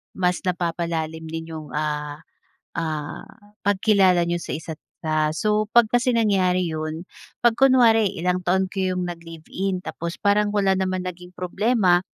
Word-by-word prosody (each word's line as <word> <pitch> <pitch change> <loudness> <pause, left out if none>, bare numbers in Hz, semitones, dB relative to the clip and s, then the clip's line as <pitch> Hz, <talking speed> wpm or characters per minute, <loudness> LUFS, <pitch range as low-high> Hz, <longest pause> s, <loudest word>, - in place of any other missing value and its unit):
mas 180 -1 +1
napapalalim 165 -2 -2
ninyong, 160 -3 -7
ah 150 -1 -2 0.6
ah, 155 -2 -3 0.4
pagkilala 195 -3 +4
niyo 175 - 0
sa - - -5
isa't 160 0 -8 0.2
isa. 155 -1 +1
So, 215 0 +1
'pag 235 -2 +6
kasi 245 +1 +3
nangyari 185 -5 +2
yun, 155 +2 -4 0.4
'pag 235 -1 +4
kunwari 230 -6 +5
ilang 180 +1 0
taon 190 +1 +2
kayong 185 -2 -1
naglive-in, 170 +3 -5
tapos 170 0 -5
parang 205 0 +3
wala 195 -2 +3
naman 185 -1 -1
naging 180 0 -7
problema, 185 0 +2
180 Hz, 135 wpm, -23 LUFS, 165-200 Hz, 0.6 s, pag